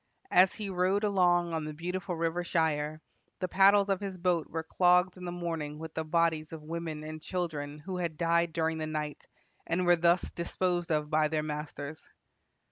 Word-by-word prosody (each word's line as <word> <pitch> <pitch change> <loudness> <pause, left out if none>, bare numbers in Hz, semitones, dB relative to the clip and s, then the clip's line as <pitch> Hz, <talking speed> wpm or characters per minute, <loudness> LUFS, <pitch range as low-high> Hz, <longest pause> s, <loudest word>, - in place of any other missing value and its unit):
As 185 +1 +6
he 210 -2 -4
rowed 185 +3 +1
along 175 -4 +3
on 160 -1 -1
the 155 0 -6
beautiful 180 +3 -3
river 165 +1 -1
Shire, 155 -2 0 0.4
the 185 - -1
paddles 195 +2 +5
of 195 -2 +1
his 195 -2 -5
boat 175 -2 +1
were 160 0 -3
clogged 180 +2 +3
in 180 -1 -9
the 175 - -3
morning 165 -4 -4
with 160 0 -8
the 160 - -2
bodies 160 -1 +1
of 160 -2 -8
women 160 -1 -5
and 155 0 -7
children 155 -5 -3
who 180 +5 -6
had 170 -3 -3
died 170 0 +2
during 160 0 -1
the 155 - -2
night, 150 -1 -4 0.4
and 180 +2 +1
were 175 0 +6
thus 170 +1 +2
disposed 175 0 -1
of 150 0 0
by 155 0 +3
their 155 0 -1
masters." 150 0 -5
170 Hz, 190 wpm, -30 LUFS, 155-180 Hz, 0.4 s, As